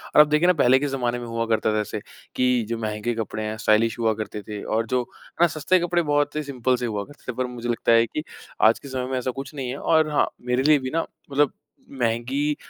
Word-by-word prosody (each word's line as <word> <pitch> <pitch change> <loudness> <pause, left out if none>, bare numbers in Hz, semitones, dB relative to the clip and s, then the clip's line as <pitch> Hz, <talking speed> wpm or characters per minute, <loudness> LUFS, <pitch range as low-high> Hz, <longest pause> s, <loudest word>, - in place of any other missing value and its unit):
और - - +10
आप 150 - +5
देखिए 150 +3 +3
ना 180 - +6
पहले 130 -5 +4
के 145 - -1
ज़माने 125 -3 -1
में 120 - -6
हुआ 115 0 -2
करता 110 -1 +1
था - - +2
ऐसे 105 - -4 0.4
कि 125 -2 +2
जो 115 - -1
महँगे 110 +1 -2
कपड़े 110 -1 -4
हैं 110 0 -3
स्टाइलिश 110 +2 +2
हुआ 110 -1 +2
करते 105 -1 -5
थे 105 -1 -5
और 115 +1 0
जो 125 +1 0 0.4
ना 175 - +7
सस्ते 165 +4 +1
कपड़े 175 0 +1
बहुत 145 -1 0
ही 155 - -1
सिंपल 130 -3 0
से 125 - -3
हुआ 105 -3 -2
करते 145 -1 -9
थे, 115 - -13
पर 130 - -1
मुझे 120 -1 -6
लगता 115 0 +1
है 115 0 +6
कि 150 +7 -5 0.4
आज 110 +1 +5
के - - -11
समय 130 -1 -3
में 130 - 0
ऐसा 130 +1 -2
कुछ 135 +3 -7
नहीं 130 -3 -4
है 130 - -4
और 160 +1 +2
हाँ, 150 - +2
मेरे 125 +1 0
लिए 150 0 +5
भी 130 -1 -4
ना 165 0 +1 0.3
मतलब 145 0 +3 0.5
महँगी 125 +6 0
125 Hz, 255 wpm, -24 LUFS, 115-145 Hz, 0.5 s, और